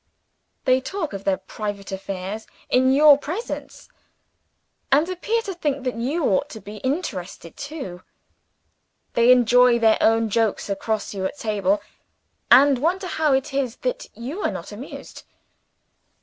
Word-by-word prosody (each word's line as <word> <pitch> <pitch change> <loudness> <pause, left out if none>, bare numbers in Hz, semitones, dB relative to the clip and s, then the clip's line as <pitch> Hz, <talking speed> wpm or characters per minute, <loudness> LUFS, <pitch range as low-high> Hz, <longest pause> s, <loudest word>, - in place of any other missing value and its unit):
They 255 0 +4
talk 320 - -4
of 195 0 -7
their 195 -1 +2
private 200 +1 -6
affairs, 195 +2 -5 0.2
in 260 +1 +4
your 290 +1 +7
presence 360 +12 -6 1.0
and 295 +4 +4
appear 430 +6 -1
to 395 -4 -4
think 290 -6 -2
that 255 -1 -1
you 275 +9 -1
ought 215 +9 +1
to 220 - -9
be 210 0 -10
interested 205 - -4
too. 275 - -7 1.1
They 235 +1 +5
enjoy 245 0 +5
their 225 -2 +4
own 225 -1 +3
jokes 220 -2 0
across 210 +2 -2
you 195 -2 -4
at 190 - -4
table 205 -4 0 0.7
and 270 +1 +7
wonder 360 +7 0
how 315 -5 +1
it 265 +1 0
is 265 -4 -1
that - - -2
you 270 - -6
are - - +1
not - - -7
amused. - - -9
250 Hz, 145 wpm, -23 LUFS, 210-295 Hz, 1.1 s, your